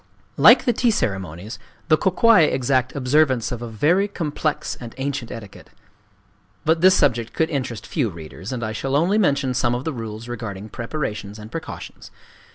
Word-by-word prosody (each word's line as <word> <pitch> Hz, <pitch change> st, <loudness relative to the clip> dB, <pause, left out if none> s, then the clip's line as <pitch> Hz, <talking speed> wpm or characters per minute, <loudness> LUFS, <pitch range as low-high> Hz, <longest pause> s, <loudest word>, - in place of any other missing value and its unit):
Like -, -, +7 dB
the 245 Hz, -, +3 dB
tea 240 Hz, +2 st, +2 dB
ceremonies, 95 Hz, -, -3 dB, 0.3 s
the 155 Hz, -, +6 dB
Kō 185 Hz, +3 st, 0 dB
kwai 230 Hz, -1 st, +6 dB
exact 130 Hz, -2 st, 0 dB
observance 130 Hz, -2 st, +2 dB
of 120 Hz, -1 st, -4 dB
a 120 Hz, -, -5 dB
very 165 Hz, -, +2 dB
complex 155 Hz, -5 st, -2 dB
and 115 Hz, -2 st, -9 dB
ancient 135 Hz, -3 st, -3 dB
etiquette. 105 Hz, -4 st, -10 dB, 1.0 s
But 160 Hz, +1 st, +2 dB
this 185 Hz, +1 st, +7 dB
subject 120 Hz, -5 st, +1 dB
could 160 Hz, 0 st, 0 dB
interest 125 Hz, -6 st, -3 dB
few 135 Hz, -9 st, -1 dB
readers; 85 Hz, +4 st, -9 dB
and 125 Hz, -2 st, -4 dB
I 110 Hz, -, -2 dB
shall 135 Hz, +5 st, -2 dB
only 180 Hz, +8 st, +3 dB
mention 140 Hz, -8 st, +1 dB
some 120 Hz, -1 st, +1 dB
of 125 Hz, -, -4 dB
the 160 Hz, -, -3 dB
rules 115 Hz, -1 st, -7 dB
regarding 110 Hz, -4 st, -6 dB
preparations 110 Hz, -5 st, -5 dB
and 105 Hz, +1 st, -10 dB
precautions. 165 Hz, -, -8 dB
130 Hz, 170 wpm, -22 LUFS, 110-155 Hz, 1.0 s, Like